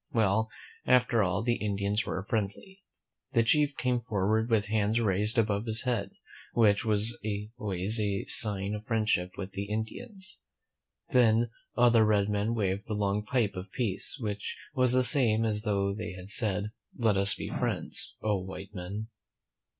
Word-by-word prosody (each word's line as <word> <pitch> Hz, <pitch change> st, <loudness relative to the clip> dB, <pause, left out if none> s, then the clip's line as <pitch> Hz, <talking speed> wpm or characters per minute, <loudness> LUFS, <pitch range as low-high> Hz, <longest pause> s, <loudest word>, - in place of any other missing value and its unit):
Well, 110 Hz, 0 st, +1 dB, 0.4 s
after 125 Hz, -2 st, +4 dB
all, 100 Hz, +2 st, 0 dB
the 120 Hz, 0 st, +1 dB
Indians 100 Hz, +1 st, -1 dB
were 95 Hz, -, -3 dB
friendly. 115 Hz, -, -4 dB, 0.5 s
The 115 Hz, -2 st, +4 dB
chief 145 Hz, +4 st, +2 dB
came 125 Hz, -1 st, 0 dB
forward 110 Hz, 0 st, 0 dB
with 110 Hz, -2 st, +2 dB
hands 110 Hz, +1 st, +1 dB
raised 105 Hz, +1 st, 0 dB
above 105 Hz, 0 st, +1 dB
his 110 Hz, 0 st, +3 dB
head, 120 Hz, -6 st, -1 dB, 0.4 s
which 105 Hz, -2 st, +3 dB
was 110 Hz, +1 st, +2 dB, 0.4 s
always 100 Hz, +1 st, 0 dB
a 100 Hz, -2 st, -1 dB
sign 100 Hz, -2 st, +1 dB
of 105 Hz, 0 st, -5 dB
friendship 110 Hz, -5 st, 0 dB
with 95 Hz, -1 st, -6 dB
the 100 Hz, +1 st, -4 dB
Indians. 190 Hz, -, -6 dB, 0.7 s
Then 115 Hz, -2 st, +3 dB, 0.3 s
other 120 Hz, -2 st, +5 dB
red 105 Hz, -1 st, +2 dB
men 105 Hz, +3 st, 0 dB
waved 100 Hz, -2 st, -1 dB
the 110 Hz, -, -3 dB
long 105 Hz, 0 st, 0 dB
pipe 110 Hz, -2 st, 0 dB
of 95 Hz, +1 st, -8 dB
peace, 120 Hz, +2 st, -2 dB
which 105 Hz, -3 st, -4 dB, 0.2 s
was 130 Hz, -3 st, +3 dB
the 130 Hz, 0 st, +4 dB
same 115 Hz, -3 st, +4 dB
as 105 Hz, -1 st, -1 dB
though 100 Hz, -2 st, 0 dB
they 105 Hz, -1 st, -5 dB
had 90 Hz, +1 st, -10 dB
said, 105 Hz, -2 st, -1 dB, 0.2 s
"Let 110 Hz, -4 st, +2 dB
us 100 Hz, +1 st, +7 dB
be -, -, -6 dB
friends, -, -, -3 dB
oh, 105 Hz, -3 st, +1 dB
white 95 Hz, +1 st, -9 dB
men!" 100 Hz, +4 st, -6 dB
105 Hz, 160 wpm, -29 LUFS, 100-115 Hz, 0.7 s, us